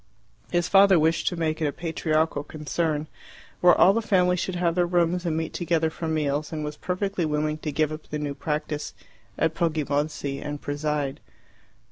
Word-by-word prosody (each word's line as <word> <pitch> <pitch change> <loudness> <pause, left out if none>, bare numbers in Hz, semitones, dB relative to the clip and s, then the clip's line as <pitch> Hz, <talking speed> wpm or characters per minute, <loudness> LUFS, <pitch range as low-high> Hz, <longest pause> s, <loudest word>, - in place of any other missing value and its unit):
His 175 0 +1
father 195 -1 +6
wished 160 +1 +2
to 180 - +1
make 160 -1 -1
it 155 - +2
a - - 0
patriarchal 160 -1 0
concern, 155 0 -2 0.5
where 180 -1 +6
all 190 - +6
the 230 - +1
family 180 -4 +3
should 185 +1 -2
have 175 -1 +1
their 175 0 +2
rooms 175 0 +1
and 160 -1 0
meet 160 0 -3
together 165 -2 0
for 165 - -5
meals, 150 -1 -1
and 155 -2 -3
was 150 0 -4
perfectly 185 +2 -2
willing 155 0 -1
to 155 - -3
give 155 +1 +1
up 155 0 -7
the 150 - -3
new 145 -1 -3
practice 150 +1 -3 0.4
at 160 -1 +1
Poggibonsi 150 -3 -1
and 145 0 -5
preside. 145 -1 -2
160 Hz, 180 wpm, -25 LUFS, 150-175 Hz, 0.5 s, father